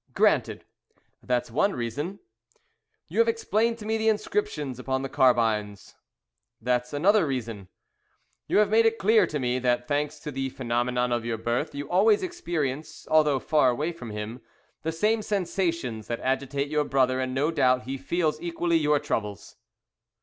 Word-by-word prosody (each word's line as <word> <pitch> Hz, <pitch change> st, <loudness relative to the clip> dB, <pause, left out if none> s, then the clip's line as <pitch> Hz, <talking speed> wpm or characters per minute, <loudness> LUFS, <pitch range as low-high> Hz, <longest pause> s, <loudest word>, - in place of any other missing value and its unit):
"Granted. -, -, +2 dB, 0.6 s
That's 125 Hz, -1 st, -1 dB
one 200 Hz, -, +1 dB
reason." 145 Hz, -, -4 dB, 0.9 s
"You 190 Hz, +8 st, -3 dB
have 230 Hz, -, +5 dB
explained 230 Hz, 0 st, +1 dB
to 215 Hz, -, -9 dB
me 220 Hz, +1 st, 0 dB
the 220 Hz, 0 st, +3 dB
inscriptions 215 Hz, -, -2 dB
upon 130 Hz, +1 st, -2 dB
the 135 Hz, -, -4 dB
carbines." 110 Hz, -6 st, +1 dB, 0.7 s
"That's 125 Hz, +1 st, -1 dB
another 180 Hz, +5 st, +3 dB
reason." 115 Hz, -7 st, -4 dB, 0.8 s
"You -, -, +1 dB
have 210 Hz, -1 st, +4 dB
made 225 Hz, +1 st, +5 dB
it 225 Hz, 0 st, 0 dB
clear 220 Hz, +3 st, +4 dB
to 150 Hz, -, -3 dB
me 125 Hz, -2 st, 0 dB
that, 120 Hz, -1 st, 0 dB
thanks 150 Hz, +1 st, -1 dB
to 150 Hz, -, -5 dB
the 135 Hz, -1 st, -3 dB
phenomenon 125 Hz, 0 st, -1 dB
of 120 Hz, -1 st, 0 dB
your 115 Hz, -1 st, -2 dB
birth, 120 Hz, +4 st, -2 dB
you 145 Hz, 0 st, -5 dB
always 205 Hz, +4 st, +3 dB
experience 160 Hz, -, -4 dB
although 150 Hz, -3 st, +4 dB
far 145 Hz, 0 st, +3 dB
away 150 Hz, +7 st, -1 dB
from 145 Hz, -9 st, -9 dB
him, 105 Hz, +3 st, -6 dB, 0.4 s
the 160 Hz, -, -2 dB
same 215 Hz, +7 st, +1 dB
sensations 170 Hz, -, -2 dB
that 120 Hz, -, -3 dB
agitate 140 Hz, +2 st, -1 dB
your 150 Hz, 0 st, +1 dB
brother, 130 Hz, -2 st, +1 dB
and 130 Hz, 0 st, -2 dB
no 145 Hz, +4 st, +1 dB
doubt 125 Hz, -5 st, +2 dB
he 130 Hz, +2 st, -4 dB
feels 155 Hz, +2 st, -1 dB
equally 170 Hz, 0 st, 0 dB
your 150 Hz, -1 st, +3 dB
troubles." 105 Hz, -6 st, -4 dB
140 Hz, 165 wpm, -26 LUFS, 125-175 Hz, 0.9 s, have